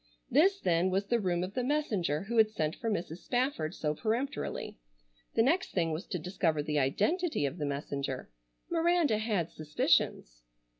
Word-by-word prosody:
This 380 - +4
then 175 - +2
was 195 +2 0
the 235 +3 +1
room 180 -4 0
of 185 +2 -5
the 250 - -1
messenger 210 - 0
who 230 +4 -3
had 220 -1 +6
sent 160 -8 -2
for 230 - -3
Mrs. 175 -6 -2
Spafford 245 - -1
so 150 -1 -1
peremptorily. 230 - -3 0.6
The 225 - +5
next 335 +9 +1
thing 165 -3 +1
was 160 +4 -4
to 180 - -2
discover 165 -3 0
the 150 0 0
identity 210 - +1
of 140 +5 -3
the 145 - -1
messenger. 140 - -4 0.4
Miranda 335 -8 +2
had 210 -7 -1
suspicions. 150 - 0
190 Hz, 165 wpm, -31 LUFS, 155-245 Hz, 0.6 s, had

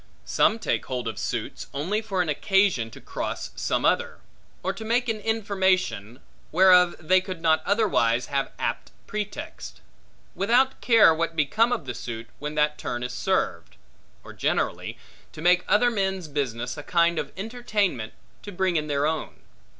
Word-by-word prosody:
Some 215 - +3
take 225 - -2
hold 125 -2 -3
of 110 -1 -4
suits, 115 0 -4
only 185 +10 -1
for 195 -5 -1
an - - -7
occasion 175 - +2
to - - -12
cross - - -5
some - - -1
other; - - +1 0.5
or 190 - -1
to 195 - -8
make 240 +2 +1
an 220 -1 -1
information, 190 - 0 0.3
whereof 180 0 +6
they 185 +3 +3
could 185 -2 -6
not 160 -1 +3
otherwise 125 - +2
have 140 0 -2
apt - - -3 0.2
pretext; 210 -1 -6 0.5
without 245 +7 +2
care 225 -8 +6
what 165 0 -2
become 210 - +2
of 245 - -1
the 125 - -4
suit, 115 -1 -7
when 150 +1 -5
that 150 0 +1
turn 120 0 -3
is 125 0 -4
served; 105 - -1 0.5
or, - - -11
generally, - - -1 0.4
to - - -10
make 180 +1 +4
other 245 +3 +4
men's 190 -5 -1
business 125 -3 -3
a - - -5
kind 170 +1 +2
of - - -4
entertainment, 205 - -2 0.3
to 205 - -8
bring 185 -2 0
in 150 0 -1
their 145 -1 0
own. 160 +1 -3
175 Hz, 165 wpm, -25 LUFS, 140-205 Hz, 0.5 s, whereof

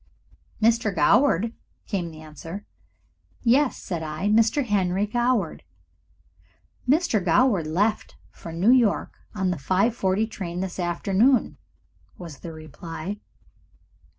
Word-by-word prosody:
"Mr. 225 -1 +3
Goward!" 230 -4 +3 0.3
came 185 -5 -3
the 155 -1 -12
answer. 165 +6 -9 0.8
"Yes," 255 +3 +3
said 175 -4 -5
I. 155 +5 -2
"Mr. 225 +6 +3
Henry 195 -2 +1
Goward." 240 -5 0 1.3
"Mr. 285 - +2
Goward 185 -1 +3
left 205 +7 0 0.2
for 165 - -10
New 180 +8 +3
York 240 -5 +2 0.2
on 190 -3 0
the 180 - -2
5.40 195 - +1
train 175 -4 -5
this 190 -1 -5
afternoon," 195 +8 +2 0.6
was 165 -6 -9
the 170 - -8
reply. 165 +5 -7
195 Hz, 110 wpm, -24 LUFS, 170-230 Hz, 1.3 s, Mr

